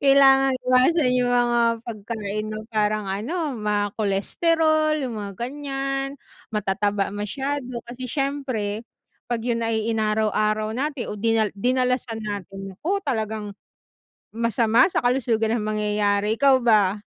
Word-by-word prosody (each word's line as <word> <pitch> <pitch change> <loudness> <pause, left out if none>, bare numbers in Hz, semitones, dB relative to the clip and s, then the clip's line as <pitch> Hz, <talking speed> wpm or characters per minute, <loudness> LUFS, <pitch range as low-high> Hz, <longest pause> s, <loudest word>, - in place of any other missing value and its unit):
kailangan 270 -1 +6
iwasan 255 +2 +4
yung 245 - +1
mga 240 -1 +3 0.2
pagkain 215 -2 -4
na 215 0 -4
parang 215 -1 +1
ano 275 - -2
mga 210 -2 -1
cholesterol 310 - +2
yung 240 -3 -4
mga 200 -1 -5
ganyan, 275 +1 -3 0.3
matataba 205 -1 -1
masyado 255 +4 -4
kasi 250 +1 -7
siyempre 260 -7 -2 0.5
pag 235 -2 -2
yun 235 -1 0
ay 225 -1 0
inaraw 215 -1 +1
araw 215 0 0
natin 270 0 -3
o - - -5
din 225 -2 +2
dinalasan 250 +1 0
natin 195 -1 -6
nako 360 - -1
talagang, 220 -5 -2 0.8
masama 230 +1 +3
sa - - +2
kalusugan 235 -3 +1
ng 215 - -2
mangyayari. 210 0 +1
Ikaw 270 -1 +5
ba? 210 -4 +3
230 Hz, 125 wpm, -23 LUFS, 210-265 Hz, 0.8 s, kailangan